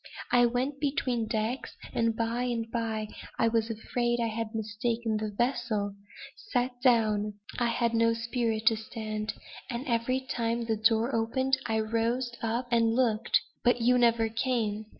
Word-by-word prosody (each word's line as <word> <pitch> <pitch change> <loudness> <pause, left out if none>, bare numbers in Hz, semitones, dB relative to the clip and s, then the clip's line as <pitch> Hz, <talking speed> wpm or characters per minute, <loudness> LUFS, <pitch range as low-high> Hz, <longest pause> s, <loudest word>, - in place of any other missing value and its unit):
I 245 -1 +6
went 255 +4 -1
between 255 -5 0
decks, 220 +4 -2 0.2
and 230 -1 +1
by 230 +2 -1
and 235 -2 -1
by 220 -2 -2 0.3
I 230 - +3
was 225 0 +1
afraid 240 +2 -1
I 230 -1 +1
had 225 0 -4
mistaken 220 +1 -1
the 215 0 -2
vessel; 230 -2 0
I 200 +1 -15 0.2
sat 245 -3 -1
down 215 -4 +3 0.2
I 240 - +2
had 235 0 +1
no 230 0 +4
spirit 230 -1 -1
to 225 0 +5
stand; 215 -1 -4 0.3
and 245 +1 -3
every 250 +1 0
time 235 -2 -1
the 225 -1 +1
door 225 +3 +3
opened 260 +4 +1
I 220 -1 +1
roused 230 +2 -1
up 230 +2 -1
and 230 -1 +3
looked 235 -3 +2 0.2
but 245 0 +4
you 250 +2 +4
never 230 -1 +4
came. 220 -3 -1
230 Hz, 160 wpm, -29 LUFS, 220-245 Hz, 0.3 s, I